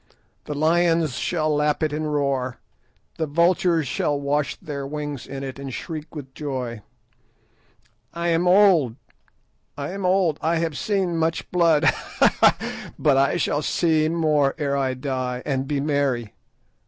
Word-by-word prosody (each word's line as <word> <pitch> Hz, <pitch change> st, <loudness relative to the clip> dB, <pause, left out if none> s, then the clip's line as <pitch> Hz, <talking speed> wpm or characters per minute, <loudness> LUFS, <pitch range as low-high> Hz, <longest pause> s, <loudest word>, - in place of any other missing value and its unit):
The 150 Hz, -, -4 dB
lions 165 Hz, -1 st, +2 dB
shall 155 Hz, -3 st, 0 dB
lap 150 Hz, +1 st, +1 dB
it 155 Hz, -1 st, 0 dB
and 155 Hz, 0 st, -2 dB
roar, 135 Hz, -3 st, -1 dB, 0.6 s
the 160 Hz, -, 0 dB
vultures 170 Hz, 0 st, +2 dB
shall 145 Hz, +3 st, -1 dB
wash 145 Hz, +1 st, -1 dB
their 140 Hz, -2 st, -6 dB
wings 145 Hz, -2 st, -5 dB
in 135 Hz, 0 st, -6 dB
it 135 Hz, 0 st, -6 dB
and 140 Hz, -1 st, -6 dB
shriek 155 Hz, +3 st, -7 dB
with 135 Hz, -3 st, -8 dB
joy. 130 Hz, -7 st, -4 dB, 1.3 s
"I 170 Hz, +1 st, -2 dB
am 170 Hz, +1 st, +2 dB
old! 180 Hz, -, +5 dB, 0.8 s
I 140 Hz, +3 st, -4 dB
am 195 Hz, +1 st, -5 dB
old! 180 Hz, -4 st, +2 dB
I 165 Hz, +1 st, +1 dB
have 165 Hz, -2 st, -1 dB
seen 190 Hz, -3 st, -1 dB
much 165 Hz, 0 st, -1 dB
blood; 170 Hz, -3 st, +3 dB
ha, 155 Hz, -, +2 dB
ha! -, -, +1 dB
but 145 Hz, -3 st, +3 dB
I 140 Hz, +5 st, +3 dB
shall 150 Hz, -2 st, 0 dB
see 155 Hz, 0 st, +1 dB
more 155 Hz, -4 st, +2 dB
ere 140 Hz, -1 st, -1 dB
I 135 Hz, -2 st, 0 dB
die, 130 Hz, -2 st, -3 dB
and 135 Hz, -2 st, -1 dB
be 145 Hz, -1 st, -1 dB
merry. 140 Hz, -6 st, -1 dB
150 Hz, 155 wpm, -23 LUFS, 140-165 Hz, 1.3 s, old